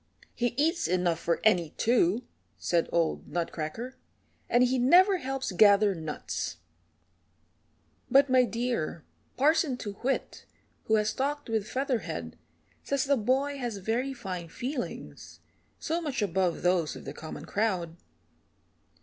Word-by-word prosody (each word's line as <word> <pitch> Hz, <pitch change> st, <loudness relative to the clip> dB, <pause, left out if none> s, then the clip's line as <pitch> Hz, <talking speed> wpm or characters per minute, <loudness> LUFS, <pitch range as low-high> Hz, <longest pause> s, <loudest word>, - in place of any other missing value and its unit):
"He 240 Hz, 0 st, -1 dB
eats 325 Hz, +3 st, +2 dB
enough 180 Hz, -2 st, +1 dB
for 170 Hz, -, 0 dB
any 175 Hz, -7 st, +3 dB
two," 230 Hz, -1 st, +2 dB, 0.3 s
said 170 Hz, -1 st, 0 dB
old 170 Hz, -2 st, 0 dB
Nutcracker, 175 Hz, -, -4 dB, 0.5 s
"and 240 Hz, +1 st, +4 dB
he 255 Hz, +1 st, +2 dB
never 365 Hz, +10 st, +6 dB
helps 270 Hz, -, -3 dB
gather 205 Hz, +1 st, +5 dB
nuts." 160 Hz, -, -4 dB, 1.5 s
"But, 275 Hz, +2 st, +6 dB
my 255 Hz, -1 st, +5 dB
dear, 230 Hz, -10 st, -2 dB, 0.3 s
Parson 295 Hz, -1 st, +3 dB
Too 205 Hz, -5 st, -5 dB
Whit, 265 Hz, +2 st, -2 dB, 0.4 s
who 220 Hz, -, +3 dB
has 215 Hz, 0 st, +1 dB
talked 290 Hz, 0 st, -2 dB
with 220 Hz, -2 st, -1 dB
Featherhead, 240 Hz, -, -3 dB, 0.5 s
says 280 Hz, -1 st, 0 dB
the 280 Hz, 0 st, +3 dB
boy 270 Hz, +5 st, 0 dB
has 240 Hz, -5 st, -3 dB
very 230 Hz, +7 st, -1 dB
fine 185 Hz, -9 st, -6 dB
feelings, 250 Hz, -, -6 dB, 0.4 s
so 330 Hz, +2 st, -2 dB
much 280 Hz, -8 st, -2 dB
above 185 Hz, -2 st, 0 dB
those 175 Hz, -3 st, +2 dB
of -, -, -10 dB
the -, -, -6 dB
common 155 Hz, -1 st, -8 dB
crowd." 180 Hz, -3 st, -1 dB
230 Hz, 130 wpm, -29 LUFS, 180-265 Hz, 1.5 s, never